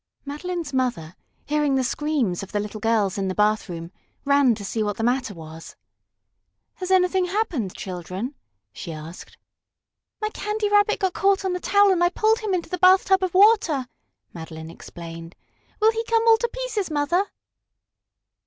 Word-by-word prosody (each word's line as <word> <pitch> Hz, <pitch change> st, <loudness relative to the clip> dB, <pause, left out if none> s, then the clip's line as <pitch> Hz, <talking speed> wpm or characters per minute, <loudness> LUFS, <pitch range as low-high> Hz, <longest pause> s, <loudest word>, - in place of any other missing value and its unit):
Madeline's 315 Hz, +1 st, -5 dB
mother, 235 Hz, -11 st, -1 dB, 0.3 s
hearing 295 Hz, -2 st, +1 dB
the 265 Hz, -, +1 dB
screams 255 Hz, -, -1 dB
of 195 Hz, -, -9 dB
the 205 Hz, -, -1 dB
little 210 Hz, +1 st, -5 dB
girls 210 Hz, -3 st, +1 dB
in 195 Hz, -, -1 dB
the 185 Hz, -, -3 dB
bathroom, 205 Hz, -5 st, 0 dB, 0.3 s
ran 280 Hz, -4 st, +4 dB
to 205 Hz, -2 st, -8 dB
see 220 Hz, +3 st, -2 dB
what 205 Hz, -1 st, -1 dB
the 225 Hz, -, -3 dB
matter 245 Hz, -3 st, 0 dB
was. 160 Hz, 0 st, -11 dB, 1.0 s
"Has 365 Hz, -1 st, -5 dB
anything 370 Hz, 0 st, +3 dB
happened, 350 Hz, -, -2 dB
children?" 185 Hz, -, -5 dB, 0.4 s
she 170 Hz, -, -7 dB
asked. 160 Hz, +2 st, -10 dB, 0.8 s
"My 425 Hz, -, -1 dB
Candy 420 Hz, 0 st, -2 dB
Rabbit 415 Hz, +1 st, +3 dB
got 380 Hz, -2 st, +1 dB
caught 390 Hz, 0 st, +2 dB
on 375 Hz, -, 0 dB
the 360 Hz, -, -2 dB
towel 405 Hz, +1 st, +4 dB
and 350 Hz, -2 st, +2 dB
I 350 Hz, -, +4 dB
pulled 435 Hz, +4 st, +2 dB
him 420 Hz, -4 st, -1 dB
into 345 Hz, -, -3 dB
the 365 Hz, -, -3 dB
bathtub 380 Hz, +1 st, +5 dB
of 370 Hz, -1 st, -2 dB
water," 380 Hz, -, +4 dB, 0.5 s
Madeline 160 Hz, -1 st, -8 dB
explained. 165 Hz, 0 st, -10 dB, 0.4 s
"Will 435 Hz, +1 st, +5 dB
he 450 Hz, 0 st, -3 dB
come 455 Hz, 0 st, +2 dB
all 450 Hz, 0 st, +7 dB
to 475 Hz, +1 st, -1 dB
pieces, -, -, -3 dB
Mother?" 310 Hz, +6 st, +1 dB
290 Hz, 165 wpm, -23 LUFS, -, 1.0 s, all